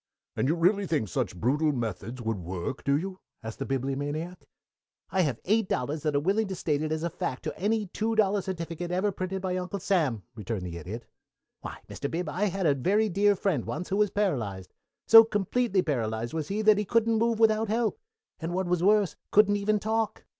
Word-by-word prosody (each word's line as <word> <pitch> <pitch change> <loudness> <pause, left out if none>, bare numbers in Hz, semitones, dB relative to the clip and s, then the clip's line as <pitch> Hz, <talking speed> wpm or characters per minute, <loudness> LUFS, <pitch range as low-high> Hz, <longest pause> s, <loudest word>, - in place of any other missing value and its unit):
"And - - 0
you 160 - +2
really 190 +4 +2
think 150 -11 0
such 115 -6 -2
brutal 150 - +2
methods 115 0 -4
would 110 -3 -2
work, 90 +8 -5
do 140 0 +2
you?" 190 +3 -5 0.2
asked 110 0 -7
the 135 - -3
Bibliomaniac. 145 +6 -3 0.6
"I 190 - +2
have 140 -9 0
eight 215 +1 +2
dollars 145 +5 -1
that 150 -1 -1
are - - +4
willing 200 +8 +1
to 190 - -4
state 150 -4 -1
it 155 0 -2
is 155 0 -2
a 170 - 0
fact 130 - -4
to - - -4
any 215 +2 0
two 220 +4 -2
dollar 205 -2 +3
certificate 170 -2 -5
ever 185 +3 +1
printed 190 +1 -4
by 185 -1 -1
Uncle 185 +2 -3
Sam," 155 - 0
returned 105 -3 -4
the 85 -2 -6
Idiot. 95 +8 -7 0.5
"Why, - - -8
Mr. 140 - -5
Bib, 170 +1 -3
I 185 +7 -1
had 195 -1 -1
a 150 - +5
very 205 - +1
dear 205 +2 +3
friend 180 - 0
once 120 +10 -5
who 195 - 0
was 210 -1 +3
paralyzed. 115 - -2 0.3
So 225 0 +10
completely 210 -1 0
paralyzed 115 -5 -2
was 160 -2 -2
he 210 +2 -2
that 215 -1 +5
he - - +1
couldn't 230 +1 +2
move 230 0 +2
without 220 0 +3
help, 225 +1 0 0.4
and, 170 +1 -3
what 190 0 0
was 175 -1 0
worse, 205 0 +3
couldn't 205 0 +5
even 210 +1 +1
talk. 220 +1 -1
180 Hz, 210 wpm, -28 LUFS, 135-205 Hz, 0.6 s, So